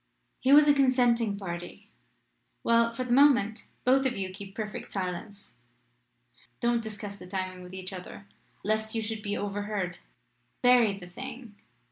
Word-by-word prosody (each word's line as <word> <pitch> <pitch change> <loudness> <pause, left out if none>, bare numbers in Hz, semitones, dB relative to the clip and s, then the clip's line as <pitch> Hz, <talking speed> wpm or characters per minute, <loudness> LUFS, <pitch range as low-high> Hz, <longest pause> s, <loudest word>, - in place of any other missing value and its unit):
"He 260 - +2
was 295 +1 +8
a 290 - +7
consenting 245 -6 +3
party. 175 -3 -7 0.7
Well; 230 0 +4
for 255 +2 -3
the 250 - -5
moment 255 -5 +4 0.2
both 265 +2 +5
of 250 - -3
you 190 -1 -3
keep 195 +1 -10
perfect 215 -1 -5
silence. 195 - -5 1.0
Don't 235 0 +2
discuss 205 -2 -7
the 180 - -11
timing 185 -1 -4
with 180 +1 -10
each 185 +1 -7
other 185 +2 -9 0.4
lest 220 +2 -1
you 225 - 0
should 220 0 -4
be 205 -1 -2
overheard: 205 -3 -3 0.6
bury 240 -5 +5
the 185 - -9
thing. 225 +5 -8
210 Hz, 150 wpm, -29 LUFS, 195-240 Hz, 1.0 s, was